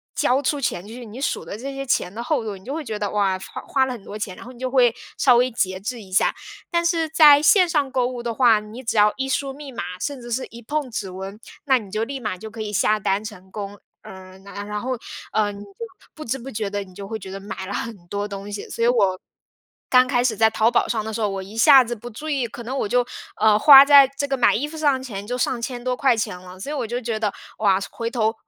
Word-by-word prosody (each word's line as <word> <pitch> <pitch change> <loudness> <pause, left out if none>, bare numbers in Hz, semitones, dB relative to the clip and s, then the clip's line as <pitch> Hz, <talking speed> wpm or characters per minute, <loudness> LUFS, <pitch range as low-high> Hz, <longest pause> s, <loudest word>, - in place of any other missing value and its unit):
交 260 +3 +2
出 285 +1 0
钱 205 -6 -2
去， 240 +2 -9
你 225 +3 -10
数 280 - -2
的 200 - -7
这 270 +4 -6
些 275 0 -5
钱 190 -7 0
的 235 +3 -5
厚 255 -1 0
度， 210 - -4
你 190 - -17
就 270 +7 -5
会 320 - -4
觉 220 -3 -4
得， 205 -1 -2
哇， 195 -2 +1
花 - - -8
花 265 -1 +1
了 260 - -4
很 225 -5 -10
多 210 - -7
钱， 200 -3 -5
然 - - -11
后 250 - -9
你 240 - -16
就 255 - -2
会 245 -3 +4 0.2
稍 250 -3 +5
微 250 +1 +2
节 185 -4 -1
制 230 +3 -5
一 190 - -14
下。 190 - +3 0.4
但 340 -1 +1
是 330 -2 +1
在 300 -2 +7
线 360 +4 +5
上 290 -5 0
购 255 -2 +1
物 245 -1 -6
的 235 - -2
话， 230 -3 +5
你 215 +4 -10
只 230 - -2
要 210 0 +5
一 270 - -2
输 270 +1 -1
密 285 -1 -9
码， 240 - -5 0.2
甚 280 +2 -4
至 240 0 -9
是 255 +3 -1
一 235 - -11
碰 290 +3 -3
指 200 -4 -4
纹， 190 +2 -7 0.3
那 265 -2 +4
你 205 -4 -12
就 215 +2 -1
立 270 +3 -5
马 210 -6 -4
就 220 +3 -8
可 225 0 -8
以 210 -1 -4
下 215 +1 +2
单 205 0 0
成 190 -3 -10
功。 205 -1 -7 0.2
嗯， 190 0 -12
然 200 +1 -8
然 210 0 -4
后， 260 - -3 0.4
呃， 210 -1 +2
你 200 - -10
就 200 - -15 0.4
不 310 - -9
知 255 +3 -2
不 260 +2 -9
觉 210 -1 -3
地 205 0 -3
你 185 -2 -17
就 200 -1 -8
会 220 +1 -4
觉 190 -1 -9
得 195 - -6
买 195 -1 -7
了 200 - -6
很 230 +1 -4
多 205 +3 -3
东 200 0 -7
西。 205 - -6
所 230 - -3
以 235 - +4
我 195 -6 +2 0.7
刚 255 0 +6
开 245 -2 +1
始 240 -3 +1
在 220 +1 +5
淘 220 +1 +2
宝 - - +2
上 220 -2 -1
的 220 - -5
时 225 - -4
候， 210 - +1
我 195 -1 -4
一 200 +4 -11
下 270 +3 +8
子 240 0 -4
不 235 +3 -9
注 300 +8 -8
意， 275 -5 0
可 235 +1 -9
能 255 +4 -5
我 - - 0
就 245 +3 +2 0.4
呃， 215 -1 +5
花 275 +3 +10
在 280 -2 +8
这 285 0 -2
个 270 - 0
买 250 - +4
衣 285 +7 -1
服 320 - -9
上 290 -3 +3
的 - - -10
钱 205 -6 -7
就 245 - -3
上 250 -1 -1
千 245 +1 -5
多 250 0 -1
块 260 -2 +3
钱 215 -5 -3
了。 185 0 -12
所 280 - -5
以 - - -3
我 260 -5 -2
就 240 +2 -3
觉 230 -2 -3
得， 215 -2 -1 0.3
哇， 195 -3 +3
回 230 - -4
头 225 -2 0
230 Hz, 305 characters per minute, -22 LUFS, 205-260 Hz, 0.7 s, 花